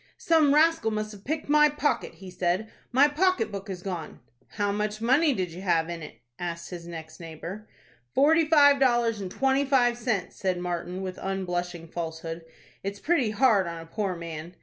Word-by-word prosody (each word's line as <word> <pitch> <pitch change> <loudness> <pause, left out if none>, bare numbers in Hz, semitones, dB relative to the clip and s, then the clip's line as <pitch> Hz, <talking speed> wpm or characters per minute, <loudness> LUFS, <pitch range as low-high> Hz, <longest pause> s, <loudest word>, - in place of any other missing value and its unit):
"Some 310 -4 +4
rascal 320 -7 +4
must 215 0 -3
have 200 -2 -12
picked 305 +5 -3
my 300 +1 +5
pocket," 295 0 -1
he 190 -1 -11
said. 180 +4 -1 0.2
"My 270 +4 +6
pocket 305 - +1
book 200 0 -6
is 180 -2 -6
gone." 175 -5 -5 0.3
"How 205 -1 -1
much 210 +1 -2
money 270 +7 +3
did 185 -8 -2
you 175 +3 -8
have 170 -3 +1
in 170 -1 -6
it?" 150 - -11 0.2
asked 170 0 -5
his 170 -1 -7
next 160 -1 -9
neighbor. 170 +6 -8 0.5
"Forty 315 +3 +4
five 285 -3 +6
dollars 240 -4 +2
and 190 - -4
twenty 270 +6 +1
five 245 -3 +2
cents," 220 -7 -2
said 185 -2 -1
Martin, 180 +1 -4
with 185 -1 -5
unblushing 180 -3 -3
falsehood. 165 0 -5 0.4
"It's 200 +1 -5
pretty 295 -7 +1
hard 215 -4 +3
on 170 0 -5
a 165 - -9
poor 190 +2 -2
man." 170 0 -7
200 Hz, 185 wpm, -27 LUFS, 175-265 Hz, 0.5 s, My